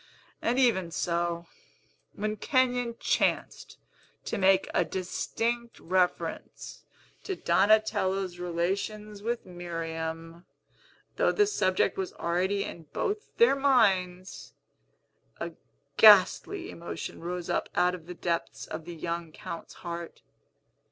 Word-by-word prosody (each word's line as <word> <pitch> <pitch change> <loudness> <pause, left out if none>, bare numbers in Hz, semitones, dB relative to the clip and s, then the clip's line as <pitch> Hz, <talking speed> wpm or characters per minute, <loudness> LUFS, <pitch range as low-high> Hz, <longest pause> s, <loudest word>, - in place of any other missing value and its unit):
And 240 +2 +1
even 215 -10 +3
so, 170 0 -1 0.7
when 215 +1 -2
Kenyon 245 0 +1
chanced - - 0 0.5
to - - -2
make 190 0 +4
a - - +3
distinct 230 +5 -3
reference 180 +1 -2 0.4
to 385 - -3
Donatello's 195 - +2
relations 200 +4 -2
with 235 +2 -2
Miriam 165 -1 -5 0.7
(though - - +3
the 415 - +4
subject 190 - +1
was 190 - -3
already 185 +4 0
in 165 -2 -8
both 420 +2 -3
their 465 -11 +6
minds), 190 -10 +1 0.8
a - - -4 0.5
ghastly 220 - +6
emotion 170 - -6
rose 175 0 -4
up - - -1
out 180 0 +3
of 170 -2 -8
the 180 - -7
depths 170 -1 -2
of 160 0 -7
the 175 0 -7
young 170 0 -4
Count's 165 +1 -8
heart. 170 0 -6
185 Hz, 110 wpm, -29 LUFS, 170-220 Hz, 0.8 s, their